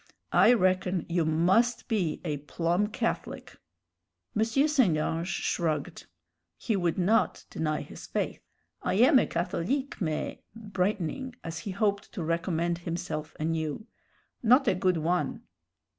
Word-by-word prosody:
I -, -, +7 dB
reckon 185 Hz, -4 st, +1 dB
you 170 Hz, -1 st, +1 dB
must 185 Hz, +10 st, +2 dB
be 195 Hz, -9 st, 0 dB
a 150 Hz, -3 st, -1 dB
plum 170 Hz, +7 st, 0 dB
Catholic." -, -, -3 dB, 0.8 s
M. 220 Hz, -, +3 dB
St. 260 Hz, -, +3 dB
Ange 165 Hz, +2 st, -1 dB
shrugged. 165 Hz, -4 st, -2 dB, 0.5 s
He 220 Hz, -, -1 dB
would 175 Hz, -4 st, 0 dB
not 210 Hz, +5 st, +2 dB
deny 155 Hz, -1 st, -1 dB
his -, -, -10 dB
faith. -, -, -2 dB, 0.4 s
"I -, -, 0 dB
am 260 Hz, +6 st, +6 dB
a -, -, +1 dB
Catholique, 190 Hz, +11 st, -2 dB
mais" 155 Hz, -4 st, -2 dB, 0.2 s
brightening 210 Hz, -, -2 dB
as 165 Hz, 0 st, -5 dB
he -, -, -6 dB
hoped 200 Hz, +1 st, -1 dB
to 180 Hz, -, -4 dB
recommend 170 Hz, +1 st, 0 dB
himself 170 Hz, -3 st, -4 dB
anew 160 Hz, +3 st, -2 dB, 0.6 s
"not 255 Hz, +3 st, +5 dB
a -, -, +5 dB
good 185 Hz, -1 st, +1 dB
one." 175 Hz, +3 st, -1 dB
180 Hz, 130 wpm, -28 LUFS, 165-215 Hz, 0.8 s, I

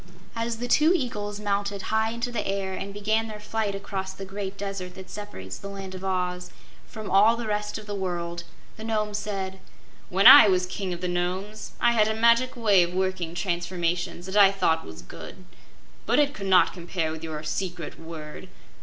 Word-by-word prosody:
As 230 Hz, 0 st, -2 dB
the 245 Hz, +2 st, -4 dB
two 305 Hz, +7 st, +4 dB
eagles 210 Hz, -, -3 dB
mounted 200 Hz, -1 st, -2 dB
high 220 Hz, 0 st, +2 dB
into 235 Hz, +2 st, -3 dB
the 220 Hz, -3 st, -2 dB
air 195 Hz, -1 st, -2 dB
and 195 Hz, +1 st, -5 dB
began 215 Hz, +2 st, 0 dB
their 215 Hz, -1 st, -8 dB
flight 210 Hz, -1 st, -2 dB
across 190 Hz, -1 st, -5 dB
the 195 Hz, +1 st, -8 dB
great 195 Hz, 0 st, -6 dB
Desert 195 Hz, -2 st, -5 dB
that 190 Hz, -1 st, -10 dB
separates 95 Hz, -, -7 dB
the -, -, -8 dB
Land 195 Hz, -1 st, -7 dB
of 185 Hz, 0 st, -8 dB
Oz 180 Hz, -1 st, -2 dB, 0.4 s
from 215 Hz, -2 st, -7 dB
all 215 Hz, +4 st, +5 dB
the 235 Hz, -, -4 dB
rest 210 Hz, -1 st, -2 dB
of 215 Hz, -, -9 dB
the 205 Hz, -, -5 dB
world, 175 Hz, -3 st, -3 dB, 0.3 s
the 220 Hz, -, -8 dB
Nome 215 Hz, -2 st, -1 dB
said: 195 Hz, -2 st, -4 dB, 0.5 s
"When 195 Hz, +2 st, +1 dB
I -, -, +12 dB
was 185 Hz, -2 st, +2 dB
King 185 Hz, +1 st, -4 dB
of 175 Hz, 0 st, -5 dB
the 180 Hz, -, -1 dB
Nomes 185 Hz, +4 st, -3 dB
I -, -, +4 dB
had 215 Hz, -2 st, +3 dB
a 220 Hz, -, 0 dB
magic 235 Hz, +3 st, +3 dB
way 210 Hz, -6 st, +4 dB
of 175 Hz, +1 st, -1 dB
working 185 Hz, -3 st, -1 dB
transformations 175 Hz, -1 st, -2 dB
that 190 Hz, +1 st, -6 dB
I 200 Hz, -2 st, +7 dB
thought 165 Hz, -5 st, +1 dB
was 80 Hz, 0 st, -10 dB
good, -, -, -11 dB, 0.6 s
but 235 Hz, -, +3 dB
it 290 Hz, -1 st, +3 dB
could 195 Hz, -6 st, -6 dB
not 185 Hz, -1 st, +5 dB
compare 170 Hz, -2 st, -3 dB
with 160 Hz, 0 st, -7 dB
your 155 Hz, -1 st, -5 dB
secret 175 Hz, +1 st, -4 dB
word. 160 Hz, -2 st, -9 dB
195 Hz, 200 wpm, -26 LUFS, 180-210 Hz, 0.6 s, I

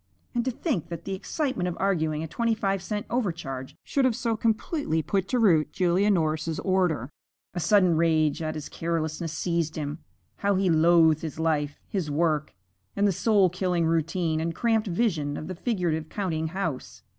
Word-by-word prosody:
And 240 Hz, -, 0 dB
to -, -, +1 dB
think 245 Hz, -, -2 dB
that 170 Hz, -1 st, -6 dB
the 195 Hz, -, -3 dB
excitement 255 Hz, -, -2 dB
of 175 Hz, -, -6 dB
arguing 160 Hz, -5 st, 0 dB
a -, -, -4 dB
twenty 230 Hz, +7 st, 0 dB
five 195 Hz, -3 st, -1 dB
cent 210 Hz, +2 st, -3 dB
overcharge 165 Hz, -, -3 dB
should 275 Hz, -, 0 dB
have 255 Hz, -3 st, +3 dB
so 230 Hz, -1 st, -1 dB
completely 220 Hz, -, 0 dB
put 190 Hz, +4 st, 0 dB
to 250 Hz, -, 0 dB
rout 175 Hz, -10 st, +4 dB
Julia 185 Hz, +3 st, +2 dB
Norris's 160 Hz, -3 st, 0 dB
order! 180 Hz, -, +1 dB, 0.4 s
A 175 Hz, -, -3 dB
sudden 185 Hz, -1 st, +4 dB
rage 160 Hz, -2 st, +2 dB
at 155 Hz, -1 st, -2 dB
his 150 Hz, -2 st, -5 dB
carelessness 165 Hz, 0 st, -2 dB
seized 170 Hz, -1 st, -1 dB
him. 150 Hz, 0 st, -4 dB, 0.4 s
How 200 Hz, 0 st, +1 dB
he 185 Hz, -1 st, +2 dB
loathed 160 Hz, -1 st, +5 dB
his 160 Hz, -1 st, -6 dB
life, 150 Hz, -3 st, 0 dB
his 185 Hz, -7 st, -2 dB
work, 155 Hz, -, 0 dB, 0.4 s
and 200 Hz, +1 st, +3 dB
the -, -, +3 dB
soul 195 Hz, -1 st, +3 dB
killing 180 Hz, -2 st, 0 dB
routine 165 Hz, 0 st, 0 dB
and 165 Hz, 0 st, -2 dB
cramped 225 Hz, -2 st, +1 dB
vision 170 Hz, -7 st, 0 dB
of 155 Hz, -, -6 dB
the 185 Hz, -, -4 dB
figurative 170 Hz, -6 st, -1 dB
counting 165 Hz, -6 st, -2 dB
house! 165 Hz, -6 st, -4 dB
170 Hz, 180 wpm, -26 LUFS, 160-200 Hz, 0.4 s, loathed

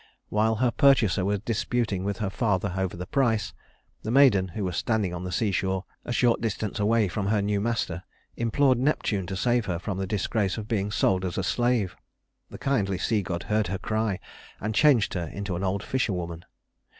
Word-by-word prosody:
While 110 Hz, +1 st, +2 dB
her 120 Hz, +2 st, +2 dB
purchaser 115 Hz, -10 st, +4 dB
was 100 Hz, +1 st, 0 dB
disputing 110 Hz, -3 st, -1 dB
with 100 Hz, +1 st, -2 dB
her 105 Hz, -3 st, -2 dB
father 100 Hz, -4 st, 0 dB
over 95 Hz, -2 st, -2 dB
the 90 Hz, -, -5 dB
price, 115 Hz, -1 st, +1 dB, 0.5 s
the 110 Hz, -, -5 dB
maiden, 120 Hz, -7 st, +5 dB
who 105 Hz, -, -2 dB
was 90 Hz, -2 st, -3 dB
standing 105 Hz, -5 st, 0 dB
on 90 Hz, +1 st, -5 dB
the 90 Hz, -, -4 dB
seashore, 95 Hz, -1 st, 0 dB, 0.2 s
a -, -, -4 dB
short 120 Hz, -1 st, +2 dB
distance 110 Hz, -2 st, -2 dB
away 110 Hz, +1 st, +3 dB
from 100 Hz, +2 st, -2 dB
her 105 Hz, 0 st, +2 dB
new 100 Hz, 0 st, 0 dB
master, 105 Hz, -6 st, -1 dB, 0.3 s
implored 125 Hz, +2 st, +2 dB
Neptune 110 Hz, -9 st, 0 dB
to 95 Hz, -, -4 dB
save 120 Hz, +4 st, +1 dB
her 90 Hz, -3 st, -1 dB
from 95 Hz, +2 st, -4 dB
the 95 Hz, -, -2 dB
disgrace 100 Hz, 0 st, -1 dB
of 105 Hz, -1 st, -5 dB
being 105 Hz, -3 st, -1 dB
sold 95 Hz, -3 st, +1 dB
as 90 Hz, -2 st, -3 dB
a 95 Hz, -, 0 dB
slave. 115 Hz, -3 st, +1 dB, 0.5 s
The -, -, -9 dB
kindly 100 Hz, -9 st, 0 dB
sea 105 Hz, +3 st, +1 dB
god 90 Hz, -1 st, -4 dB
heard 105 Hz, 0 st, 0 dB
her 95 Hz, +2 st, -2 dB
cry, 110 Hz, -2 st, -1 dB, 0.4 s
and 105 Hz, +2 st, -2 dB
changed 130 Hz, -5 st, +4 dB
her 85 Hz, -3 st, -2 dB
into 100 Hz, +1 st, -4 dB
an 90 Hz, -, -3 dB
old 100 Hz, +2 st, -1 dB
fisherwoman. 90 Hz, -10 st, -2 dB
105 Hz, 195 wpm, -26 LUFS, 95-115 Hz, 0.5 s, maiden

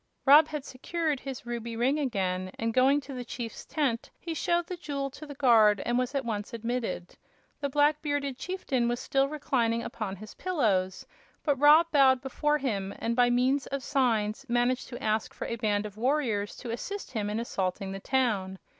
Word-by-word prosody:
Rob 295 Hz, +3 st, +8 dB
had 300 Hz, -3 st, -5 dB
secured 310 Hz, +2 st, -2 dB
his 270 Hz, -2 st, -7 dB
ruby 235 Hz, -1 st, -4 dB
ring 265 Hz, +6 st, +2 dB
again, 185 Hz, -8 st, -1 dB
and 225 Hz, 0 st, -1 dB
going 270 Hz, +4 st, +4 dB
to 275 Hz, -, -9 dB
the 250 Hz, -1 st, -5 dB
chief's 235 Hz, -2 st, -6 dB
tent 265 Hz, -7 st, -1 dB
he 335 Hz, -, -4 dB
showed 345 Hz, +1 st, 0 dB
the 365 Hz, -, -5 dB
jewel 280 Hz, -5 st, -4 dB
to 305 Hz, +3 st, -10 dB
the 285 Hz, -, -8 dB
guard 220 Hz, -6 st, +5 dB
and 240 Hz, -, 0 dB
was 250 Hz, +2 st, 0 dB
at 270 Hz, -2 st, -1 dB
once 215 Hz, -1 st, -3 dB
admitted. 230 Hz, -6 st, -3 dB, 0.4 s
The 280 Hz, -, -2 dB
black 295 Hz, +2 st, +3 dB
bearded 285 Hz, -3 st, -1 dB
chieftain 280 Hz, -10 st, -1 dB
was 240 Hz, 0 st, -1 dB
still 275 Hz, 0 st, +1 dB
reclining 235 Hz, -6 st, 0 dB
upon 205 Hz, -4 st, -4 dB
his 215 Hz, +2 st, -11 dB
pillows, 200 Hz, -, 0 dB, 0.4 s
but 285 Hz, -4 st, +1 dB
Rob 300 Hz, +3 st, +7 dB
bowed 265 Hz, -3 st, +5 dB
before 295 Hz, +3 st, 0 dB
him, 200 Hz, -9 st, -2 dB
and 230 Hz, +1 st, -1 dB
by 245 Hz, 0 st, +4 dB
means 255 Hz, +3 st, +2 dB
of 275 Hz, -1 st, -4 dB
signs 230 Hz, -6 st, +1 dB
managed 245 Hz, +1 st, +1 dB
to 245 Hz, -, -8 dB
ask 215 Hz, 0 st, -1 dB
for -, -, -5 dB
a 230 Hz, -, -3 dB
band 210 Hz, -1 st, 0 dB
of 210 Hz, -1 st, -8 dB
warriors 235 Hz, -5 st, 0 dB
to 240 Hz, -, -6 dB
assist 400 Hz, -, -5 dB
him 215 Hz, -4 st, -2 dB
in 210 Hz, +2 st, -2 dB
assaulting 190 Hz, -4 st, -2 dB
the 195 Hz, -, -5 dB
town. 205 Hz, -6 st, 0 dB
250 Hz, 190 wpm, -28 LUFS, 220-285 Hz, 0.4 s, Rob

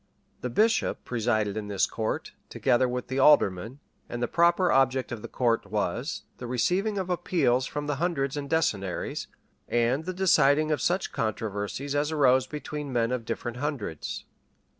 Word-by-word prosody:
The 125 Hz, -, -3 dB
bishop 220 Hz, -, +1 dB
presided 110 Hz, -4 st, 0 dB
in 105 Hz, -1 st, -4 dB
this 100 Hz, -2 st, +2 dB
court, 110 Hz, -1 st, -3 dB, 0.2 s
together 125 Hz, +1 st, +2 dB
with 125 Hz, 0 st, -3 dB
the 130 Hz, +1 st, -2 dB
alderman; 130 Hz, -3 st, +4 dB, 0.3 s
and 120 Hz, -, -4 dB
the 120 Hz, -, 0 dB
proper 175 Hz, +3 st, +3 dB
object 130 Hz, -1 st, +2 dB
of 120 Hz, -3 st, -5 dB
the -, -, -6 dB
court 115 Hz, -5 st, 0 dB
was, 110 Hz, -, -2 dB, 0.2 s
the 125 Hz, -, -6 dB
receiving 185 Hz, -, 0 dB
of 185 Hz, -2 st, -2 dB
appeals 135 Hz, -9 st, +1 dB
from 145 Hz, 0 st, -4 dB
the 145 Hz, -1 st, -2 dB
hundreds 140 Hz, -5 st, -1 dB
and 140 Hz, -1 st, -4 dB
decennaries, 100 Hz, -, -1 dB, 0.4 s
and 120 Hz, +6 st, +1 dB
the 185 Hz, -, -3 dB
deciding 155 Hz, -5 st, +4 dB
of 150 Hz, -, 0 dB
such 180 Hz, +2 st, 0 dB
controversies 110 Hz, +4 st, -3 dB
as 145 Hz, +2 st, 0 dB
arose 130 Hz, -4 st, +4 dB
between 150 Hz, -1 st, -5 dB
men 120 Hz, -1 st, +1 dB
of 125 Hz, -3 st, -2 dB
different 120 Hz, +1 st, -4 dB
hundreds. 125 Hz, -, -4 dB
130 Hz, 160 wpm, -27 LUFS, 115-150 Hz, 0.4 s, alderman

